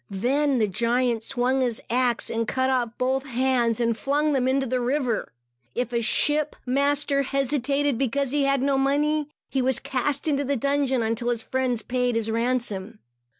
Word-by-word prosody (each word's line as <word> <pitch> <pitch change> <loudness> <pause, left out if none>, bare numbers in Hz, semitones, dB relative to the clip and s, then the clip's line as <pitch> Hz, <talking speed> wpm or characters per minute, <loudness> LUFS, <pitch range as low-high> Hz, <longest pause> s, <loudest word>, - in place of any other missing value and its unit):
Then 265 +8 +1
the 215 -3 +2
giant 235 +3 0
swung 255 +2 0
his 240 -3 0
axe 245 0 0
and 230 -1 -1
cut 260 +1 0
off 245 -3 +1
both 265 +1 0
hands, 250 -3 +1
and 230 -1 +1
flung 290 +5 0
them 260 -2 +1
into 265 +1 +1
the 255 0 -1
river. 250 -2 -1 0.4
If 245 -1 -2
a 235 - +1
ship 300 +6 +2
master 280 +2 +1
hesitated, 275 0 0
because 275 0 0
he 290 -1 +2
had 275 -1 +1
no 275 -1 +2
money, 295 +2 +1 0.2
he 270 - +1
was 260 -1 +2
cast 280 +3 -2
into 285 -2 0
a - - +2
dungeon, 275 -1 +1
until 230 +2 -1
his 235 -2 -1
friends 255 -4 -1
paid 250 -1 0
his 225 -1 -1
ransom. 230 -3 -2
260 Hz, 175 wpm, -25 LUFS, 240-275 Hz, 0.4 s, the